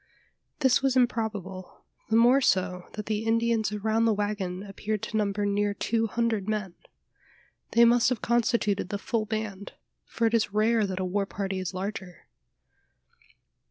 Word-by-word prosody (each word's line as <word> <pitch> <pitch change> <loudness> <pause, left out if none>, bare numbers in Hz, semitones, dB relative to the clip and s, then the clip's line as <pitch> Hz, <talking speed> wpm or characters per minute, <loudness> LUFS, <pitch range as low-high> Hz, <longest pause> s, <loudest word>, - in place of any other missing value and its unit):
This 265 -2 +4
was 270 -1 +1
improbable: 215 -7 -2 0.3
the 220 - +2
more 245 +4 +5
so, 185 -6 0
that 210 -1 -6
the 215 0 -2
Indians 225 -1 +1
around 220 +2 0
the 225 -2 +3
waggon 200 -3 -3
appeared 210 +1 -4
to - - -5
number 205 -1 0
near 205 0 0
two 225 +1 0
hundred 225 -3 -1
men. 210 -4 -2 1.0
They 235 +1 +7
must 235 0 +4
have 250 -3 -1
constituted 230 -5 +1
the 205 - -2
full 215 +1 -2
band: 215 -2 -4 0.3
for 230 - -1
it 225 - +2
is 220 -3 +1
rare 220 0 +3
that 190 -1 -4
a 185 - -1
war 195 +2 -1
party 195 -2 -3
is 185 0 -4
larger. 190 -2 -6
215 Hz, 160 wpm, -27 LUFS, 195-230 Hz, 1.0 s, They